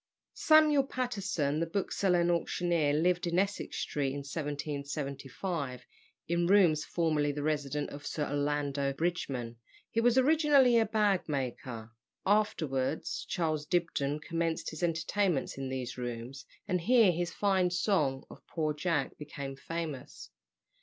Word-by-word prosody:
Samuel 305 Hz, -3 st, +5 dB
Patterson, 200 Hz, -, -1 dB
the 165 Hz, -, 0 dB
bookseller 185 Hz, 0 st, +1 dB
and 170 Hz, 0 st, +2 dB
auctioneer, 170 Hz, -2 st, +1 dB
lived 175 Hz, +3 st, +2 dB
in 170 Hz, +1 st, 0 dB
Essex 200 Hz, +2 st, -1 dB
Street, 140 Hz, -2 st, -1 dB
in 140 Hz, -, -4 dB
1775, 140 Hz, -1 st, -4 dB, 0.4 s
in 170 Hz, +1 st, +1 dB
rooms 175 Hz, -6 st, +5 dB
formerly 155 Hz, -4 st, 0 dB
the 145 Hz, 0 st, -4 dB
residence 150 Hz, -1 st, -1 dB
of 145 Hz, 0 st, -8 dB
Sir 150 Hz, -, -2 dB
Orlando 145 Hz, -1 st, -1 dB
Bridgeman. 135 Hz, -7 st, -2 dB, 0.3 s
He 230 Hz, -, +1 dB
was 245 Hz, +1 st, +3 dB
originally 280 Hz, -3 st, +5 dB
a 225 Hz, -, +2 dB
bag 205 Hz, -5 st, +1 dB
maker. 125 Hz, -4 st, -4 dB, 0.3 s
Afterwards 160 Hz, -9 st, 0 dB
Charles 155 Hz, -3 st, -1 dB
Dibdin 155 Hz, -4 st, 0 dB
commenced 165 Hz, 0 st, -2 dB
his 155 Hz, -, -8 dB
entertainments 170 Hz, -2 st, 0 dB
in 135 Hz, -1 st, -3 dB
these 130 Hz, -1 st, -4 dB
rooms, 120 Hz, +3 st, -6 dB, 0.2 s
and 180 Hz, -3 st, 0 dB
here 225 Hz, 0 st, +5 dB
his 175 Hz, 0 st, -2 dB
fine 190 Hz, -3 st, +2 dB
song 175 Hz, -7 st, +1 dB
of -, -, -12 dB
"Poor 155 Hz, -2 st, -1 dB
Jack" 150 Hz, -2 st, -1 dB
became 140 Hz, -2 st, -6 dB
famous. 150 Hz, -, -6 dB
160 Hz, 135 wpm, -31 LUFS, 140-185 Hz, 0.4 s, Samuel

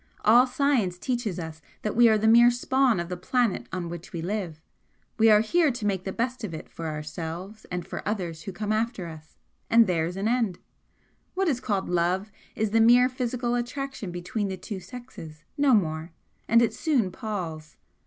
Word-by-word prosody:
All 240 Hz, +4 st, +7 dB
science 255 Hz, -8 st, +1 dB
teaches 235 Hz, -3 st, -2 dB
us 160 Hz, -2 st, -7 dB, 0.2 s
that 215 Hz, -, -2 dB
we 235 Hz, 0 st, +7 dB
are 220 Hz, -, +4 dB
the 215 Hz, +1 st, +1 dB
mere 235 Hz, +2 st, +7 dB
spawn 250 Hz, -2 st, +2 dB
of 170 Hz, -, -3 dB
the 180 Hz, -, -4 dB
planet 230 Hz, +4 st, 0 dB
on 180 Hz, -2 st, -3 dB
which 170 Hz, 0 st, -8 dB
we 165 Hz, -2 st, -5 dB
live, 180 Hz, -5 st, -3 dB, 0.6 s
we 225 Hz, 0 st, +6 dB
are 210 Hz, -1 st, +7 dB
here 315 Hz, +8 st, +3 dB
to 240 Hz, -4 st, -4 dB
make 190 Hz, -2 st, -1 dB
the 190 Hz, -, -2 dB
best 245 Hz, +3 st, -2 dB
of 180 Hz, -7 st, -4 dB
it -, -, -8 dB
for 165 Hz, -, -7 dB
ourselves 165 Hz, +7 st, -6 dB
and 180 Hz, -1 st, -5 dB
for -, -, -6 dB
others 180 Hz, -6 st, -3 dB
who 195 Hz, -, -6 dB
come 210 Hz, +3 st, -3 dB
after 220 Hz, -3 st, -1 dB
us 160 Hz, -1 st, -11 dB, 0.3 s
and 230 Hz, 0 st, +6 dB
there's 175 Hz, -1 st, -1 dB
an 200 Hz, +2 st, -1 dB
end. 230 Hz, -6 st, +1 dB, 0.8 s
What 385 Hz, 0 st, +1 dB
is 270 Hz, -6 st, +1 dB
called 200 Hz, -6 st, -1 dB
Love 180 Hz, +4 st, 0 dB, 0.2 s
is 220 Hz, -1 st, -1 dB
the 225 Hz, +1 st, +4 dB
mere 245 Hz, +2 st, +6 dB
physical 250 Hz, -1 st, -2 dB
attraction 245 Hz, -2 st, -3 dB
between 200 Hz, +5 st, -3 dB
the 190 Hz, -1 st, -4 dB
two 190 Hz, +2 st, -6 dB
sexes 180 Hz, -7 st, -11 dB
no 285 Hz, -4 st, +4 dB
more, 160 Hz, -4 st, -1 dB, 0.3 s
and 230 Hz, +1 st, +5 dB
it 230 Hz, -, +1 dB
soon 255 Hz, -, +1 dB
palls. 175 Hz, -8 st, -6 dB
210 Hz, 195 wpm, -26 LUFS, 175-240 Hz, 0.8 s, All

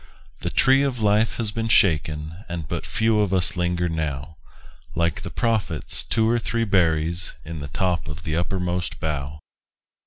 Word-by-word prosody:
The -, -, -2 dB
tree 135 Hz, +1 st, +4 dB
of 135 Hz, -3 st, 0 dB
life 105 Hz, +1 st, +2 dB
has 110 Hz, -3 st, +3 dB
been 115 Hz, +1 st, -2 dB
shaken, 80 Hz, -3 st, +1 dB
And 85 Hz, -4 st, -4 dB
but -, -, -4 dB
few 110 Hz, -1 st, +2 dB
of 105 Hz, -3 st, +1 dB
us 95 Hz, +1 st, +1 dB
linger 90 Hz, 0 st, 0 dB
now, 75 Hz, -2 st, -4 dB, 0.6 s
Like 85 Hz, 0 st, 0 dB
the -, -, -6 dB
Prophet's 110 Hz, -9 st, 0 dB
two 110 Hz, -1 st, +1 dB
or 120 Hz, +1 st, +2 dB
three 115 Hz, 0 st, -1 dB
berries 85 Hz, -3 st, +2 dB
In 80 Hz, 0 st, -6 dB
the 70 Hz, -, -5 dB
top 90 Hz, +2 st, -1 dB
of 75 Hz, +2 st, -7 dB
the 80 Hz, -, -2 dB
uppermost 90 Hz, -4 st, -2 dB
bough. 75 Hz, -1 st, -3 dB
90 Hz, 165 wpm, -23 LUFS, 80-105 Hz, 0.6 s, tree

